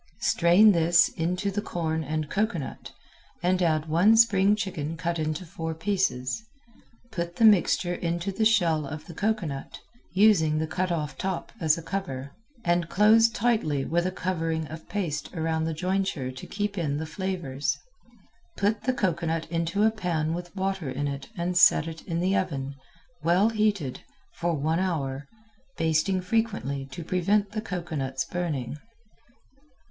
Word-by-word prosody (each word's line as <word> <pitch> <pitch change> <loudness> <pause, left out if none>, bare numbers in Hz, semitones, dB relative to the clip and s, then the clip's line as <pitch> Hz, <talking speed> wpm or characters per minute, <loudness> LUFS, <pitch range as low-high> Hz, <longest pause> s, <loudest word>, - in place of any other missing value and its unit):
Strain 180 +6 +5
this 170 -1 +4
into 180 +5 -2
the 205 +2 -2
corn 160 -4 -2
and 155 +1 -2
cocoanut 195 -6 -3 0.5
and 180 +1 +2
add 155 -3 +2
one 175 +8 +4
spring 205 -3 +5
chicken 165 -6 -4
cut 170 0 -2
in 155 0 -1
four 165 -2 -5
pieces. 165 - -1 0.7
Put 170 -1 -4
the 225 - +4
mixture 185 -3 +4
into 170 +2 -2
the 220 +3 -1
shell 170 -9 +3
of 155 +2 -7
the 170 - -10
cocoanut, 180 -8 -2 0.4
using 185 -7 +4
the 160 - 0
cut 185 +3 -2
off 150 -4 -3
top 190 -2 -3
as 160 -1 +3
a 165 - -7
cover, 140 -9 -4 0.3
and 175 -1 +1
close 220 +3 +5
tightly 215 - 0
with 175 +2 +1
a - - -1
covering 165 -4 -2
of 160 +1 -9
paste 170 -8 -3
around 160 -1 0
the 165 - -1
jointure 180 -6 -1
to 130 - -9
keep 205 -1 -3
in 145 -4 -1
the 160 - -3
flavors. 170 -6 -2 0.8
Put 205 +2 0
the 255 - +2
cocoanut 165 -7 -1
into 170 +4 0
a 220 - +5
pan 170 -7 -1
with 175 +2 -6
water 190 -5 -2
in 140 +3 -2
it 140 -1 -5
and 175 +1 -1
set 165 -2 +4
in 165 -2 -1
the 190 +2 +2
oven, 140 -8 -2 0.5
well 180 +7 +3
heated, 210 - 0 0.3
for 170 -1 -1
one 155 +3 0
hour, 145 -7 -2 0.5
basting 165 +4 +1
frequently 180 - -1
to 135 +5 -8
prevent 195 +4 +1
the 215 0 -3
cocoanut's 160 -10 -3
burning. 150 -7 -3
170 Hz, 155 wpm, -27 LUFS, 155-195 Hz, 0.8 s, Strain